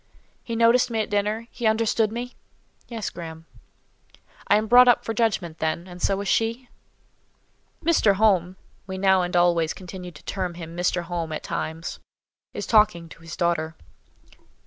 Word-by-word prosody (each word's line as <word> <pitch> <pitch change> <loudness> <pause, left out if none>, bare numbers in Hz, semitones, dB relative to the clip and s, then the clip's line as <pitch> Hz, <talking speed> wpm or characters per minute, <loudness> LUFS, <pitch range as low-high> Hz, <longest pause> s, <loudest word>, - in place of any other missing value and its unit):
"He 230 - -4
noticed 230 +2 +4
me 225 -1 -1
at 210 - -5
dinner? 210 +2 0
He 240 -3 -2
understood 220 0 +2
me?" 245 +2 -5 0.5
"Yes, 225 -4 -4
Graham." 160 -1 -9 1.0
"I - - +5
am 215 - 0
brought 245 +3 +7
up 245 - +4
for 225 - -2
judgment, 200 -8 -1
then, 160 +3 -2
and 180 -1 -11
so 195 +1 +1
is 200 - -5
she?" 230 +5 0 1.2
"Mr. 265 -12 +4
Home" 190 -4 +2 0.3
(we 190 0 -5
now 190 -1 +4
and 180 0 -3
always 170 -2 +3
continued 180 -2 -9
to - - -14
term 185 -3 -3
him 165 -1 -8
Mr. 175 0 0
Home 170 -2 -4
at 155 - -4
times) 160 +2 -4 0.5
"is - - -5
talking 210 -7 +3
to 165 - -14
his 165 0 -9
daughter." 165 -3 0
190 Hz, 165 wpm, -24 LUFS, 170-225 Hz, 1.2 s, brought